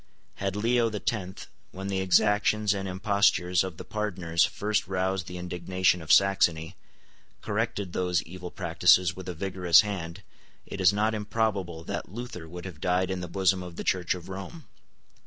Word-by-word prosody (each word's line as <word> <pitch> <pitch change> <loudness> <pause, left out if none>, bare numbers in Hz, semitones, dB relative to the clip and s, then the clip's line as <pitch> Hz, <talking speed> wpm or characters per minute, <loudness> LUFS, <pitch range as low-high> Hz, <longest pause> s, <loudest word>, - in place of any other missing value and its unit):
Had 95 0 -2
Leo 115 +2 +2
the 105 -1 -4
Tenth, 95 -2 -4 0.3
when 95 +1 -7
the 95 -1 -1
exactions 105 +2 +3
and 95 -1 -4
impostures 95 -2 +2
of 95 -3 -6
the - - -7
Pardoners 90 -6 0
first 105 0 -1
roused 95 -1 -1
the 90 - -7
indignation 90 0 0
of 80 -1 -3
Saxony, 90 -3 +3 0.7
corrected 105 -3 -2
those 90 -2 0
evil 90 +1 -8
practices 90 +1 +3
with 95 0 -8
a 90 - -5
vigorous 90 -1 +4
hand, 95 -6 -5 0.4
it 100 - -6
is 90 - +6
not 105 +2 +1
improbable 105 -6 -2
that - - -5
Luther 110 -7 -7
would 90 +2 -8
have 85 -5 -9
died 90 +1 +1
in 95 -1 -3
the 90 - -5
bosom 95 +1 +1
of 90 -2 -8
the - - -5
Church 90 -1 0
of 90 -2 -10
Rome. 100 - -8
95 Hz, 170 wpm, -27 LUFS, 90-100 Hz, 0.7 s, is